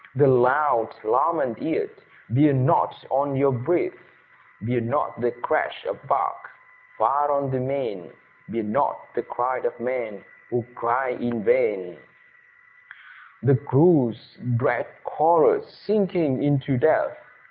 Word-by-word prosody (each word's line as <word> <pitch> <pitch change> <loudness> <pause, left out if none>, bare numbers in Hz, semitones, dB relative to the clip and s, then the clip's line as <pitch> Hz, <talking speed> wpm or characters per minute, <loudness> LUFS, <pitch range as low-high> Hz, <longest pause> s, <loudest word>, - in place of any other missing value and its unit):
The 145 +2 +5
loud 125 -2 +3
lament - - +1
yet - - -1 0.4
bear 145 +4 +4
not 130 -1 +1
on 140 +1 0
your 140 +1 +3
breath! 135 +8 0 0.7
Bear 120 +3 -1
not 120 0 -2
the 120 - +2
crash 460 - -2
of - - -5
bark - - -1 0.5
far 145 +1 +2
on 140 -1 0
the 130 - -1
main, 130 -9 -4 0.4
Bear 115 -1 -3
not 105 0 0
the - - -2
cry 125 +1 -2
of 120 - -4
men, 120 -5 -4 0.2
who 120 - -1
cry 125 +2 0
in 120 -1 -3
vain, 480 -1 +1 1.4
The 140 - +5
crew's 135 -4 +2 0.2
dread 130 - 0 0.2
chorus 425 - +3
sinking 180 -10 +1
into 140 -2 +1
death! 155 - +2
135 Hz, 125 wpm, -24 LUFS, 120-150 Hz, 1.4 s, The